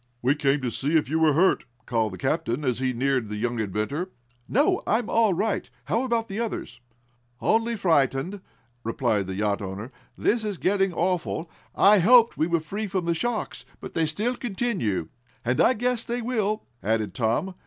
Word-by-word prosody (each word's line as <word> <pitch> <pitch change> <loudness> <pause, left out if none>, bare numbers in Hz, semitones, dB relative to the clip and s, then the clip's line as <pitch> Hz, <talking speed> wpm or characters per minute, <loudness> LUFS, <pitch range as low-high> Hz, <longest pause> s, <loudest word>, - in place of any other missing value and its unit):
"We 130 +3 +4
came 145 -1 +1
to 125 - -1
see 150 +7 +1
if 150 -3 -1
you 160 - +2
were 160 -2 +4
hurt," 180 0 +3 0.2
called 110 -3 0
the - - -6
captain, 140 - -1
as 125 -2 0
he 130 -1 +1
neared 130 -2 0
the 105 - -4
young 120 +2 -2
inventor. 110 - -2 0.4
"No, 305 - +3
I'm 220 +1 +1
all 220 -5 +3
right. 210 +4 -1 0.2
How 230 - +1
about 230 -2 0
the 200 +1 -5
others?" 235 -2 -4 0.6
"Only 230 +1 +2
frightened," 165 - +1 0.4
replied 110 -4 0
the 95 - -4
yacht 105 0 0
owner. 100 +5 -6 0.3
"This 230 0 +1
is 205 -3 -3
getting 195 +1 +1
awful. 170 -2 -1 0.2
I 205 +1 +6
hoped 230 +5 +6
we 155 - +1
were 170 -1 +1
free 205 +8 -4
from 185 -2 -2
the 170 - +2
shocks, 235 +6 -3 0.2
but - - -9
they 165 -1 +1
still 215 +10 -1
continue." 195 - -2 0.4
"And 125 +2 +2
I 250 - +5
guess 245 0 0
they 240 0 -3
will," 215 -3 -1 0.2
added 110 0 0
Tom. 120 +10 0
165 Hz, 185 wpm, -25 LUFS, -, 0.6 s, I